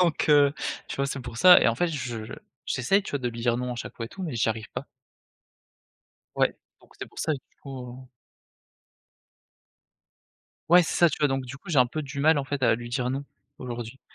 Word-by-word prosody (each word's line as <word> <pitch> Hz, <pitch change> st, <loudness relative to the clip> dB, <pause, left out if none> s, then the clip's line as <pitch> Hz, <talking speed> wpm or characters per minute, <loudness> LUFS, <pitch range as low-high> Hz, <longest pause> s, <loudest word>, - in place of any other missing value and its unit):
Donc 170 Hz, -4 st, +1 dB
heu, 145 Hz, -1 st, +5 dB, 0.3 s
tu -, -, -5 dB
vois? 140 Hz, -, 0 dB
c'est 140 Hz, 0 st, -4 dB
pour 120 Hz, -2 st, -8 dB
ça 180 Hz, +7 st, +8 dB
et -, -, +4 dB
en 115 Hz, -, +1 dB
fait 175 Hz, +7 st, 0 dB
je 125 Hz, -8 st, -4 dB, 0.4 s
j'essaye, 195 Hz, +11 st, +2 dB
tu 195 Hz, -, -7 dB
vois, 145 Hz, -, -1 dB
de 125 Hz, -2 st, -2 dB
lui 115 Hz, 0 st, -7 dB
dire: 120 Hz, -1 st, +2 dB
«Non» 125 Hz, 0 st, -3 dB
à -, -, -7 dB
chaque -, -, -7 dB
fois 115 Hz, -, -5 dB
et -, -, -12 dB
tout 190 Hz, -, -9 dB
mais, 160 Hz, -7 st, -4 dB
j'y 115 Hz, -1 st, +1 dB
arrive 110 Hz, 0 st, -4 dB
pas. -, -, -5 dB, 1.5 s
Ouais, -, -, +2 dB, 0.3 s
donc -, -, -23 dB
c'est -, -, -6 dB
pour -, -, -15 dB
ça 155 Hz, -, 0 dB
du 140 Hz, -, -4 dB, 0.2 s
coup. 130 Hz, -2 st, -9 dB, 2.6 s
Ouais, 175 Hz, +2 st, +7 dB
c'est 165 Hz, -, -2 dB
ça, 175 Hz, -, +6 dB
tu 150 Hz, -, -5 dB
vois? 150 Hz, -, +4 dB
Donc 135 Hz, -1 st, -1 dB
du 130 Hz, +2 st, -8 dB
coup 140 Hz, -, -11 dB
j'ai 150 Hz, -, +3 dB
un 125 Hz, -, +6 dB
peu 155 Hz, +6 st, -4 dB
du 140 Hz, 0 st, -7 dB
mal 155 Hz, +2 st, +4 dB
en 140 Hz, -, -2 dB
fait 145 Hz, 0 st, -3 dB
à 115 Hz, -, +5 dB
lui 120 Hz, +1 st, -7 dB
dire 125 Hz, +1 st, -1 dB
non 135 Hz, +2 st, -3 dB, 0.3 s
aujourd'hui, 120 Hz, +1 st, -7 dB
135 Hz, 230 wpm, -26 LUFS, 120-150 Hz, 2.6 s, ça